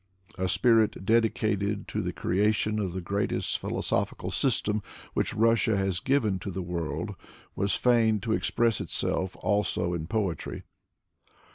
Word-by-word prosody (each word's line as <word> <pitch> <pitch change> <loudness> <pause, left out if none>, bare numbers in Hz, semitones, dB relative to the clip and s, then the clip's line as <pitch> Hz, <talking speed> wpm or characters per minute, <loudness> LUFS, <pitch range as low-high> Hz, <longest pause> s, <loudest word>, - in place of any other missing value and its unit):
A 95 0 -1
spirit 110 +1 +3
dedicated 105 -2 +1
to - - -2
the - - -2
creation 105 +3 +1
of 95 -4 -1
the 95 - -3
greatest 100 +4 -1
philo - - -3
sophical - - -1
system 105 0 +1 0.3
which - - -1
Russia 115 -1 +3
has 95 -2 0
given 115 -8 +1
to 100 - -5
the 95 0 -4
world 85 -2 -3 0.4
was 100 0 +1
fain 115 -3 +3
to 110 +2 -1
express 115 0 +1
itself 95 0 -1
also 100 -4 0
in 80 -2 -3
poetry. 100 -6 -2
105 Hz, 140 wpm, -28 LUFS, 95-110 Hz, 0.4 s, spirit